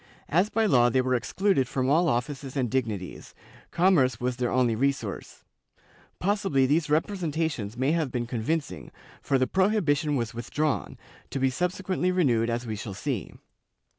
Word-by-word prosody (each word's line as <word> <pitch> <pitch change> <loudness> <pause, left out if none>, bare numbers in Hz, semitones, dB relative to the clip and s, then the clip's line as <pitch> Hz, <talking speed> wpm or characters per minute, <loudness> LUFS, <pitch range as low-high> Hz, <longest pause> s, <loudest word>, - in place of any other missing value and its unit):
As 180 +7 +2
by 225 +1 +1
law 125 - +4
they 130 - +2
were 130 0 0
excluded 135 - +1
from 130 0 -1
all 165 +5 +3
offices 135 +2 -3
and 125 -4 0
dignities, 110 -8 -3 0.3
commerce 155 - +3
was 125 0 -2
their 125 -1 0
only 125 -3 +2
resource.^ 135 -4 -2 0.7
Possibly 195 -9 +1
these 150 +3 +1
representations 155 - -1
may 130 +3 +1
have 160 -5 0
been 120 -1 -2
convincing, 120 - -3 0.3
for 135 - +1
the 130 - +2
prohibition 165 -6 +1
was 120 -2 -2
withdrawn, 140 +6 -2 0.3
to - - -4
be 130 0 +2
subsequently 185 +3 -1
renewed 120 -11 +2
as 120 +1 -2
we 110 -2 -3
shall 100 -1 -6
see. 125 0 -3
135 Hz, 155 wpm, -27 LUFS, 120-165 Hz, 0.7 s, law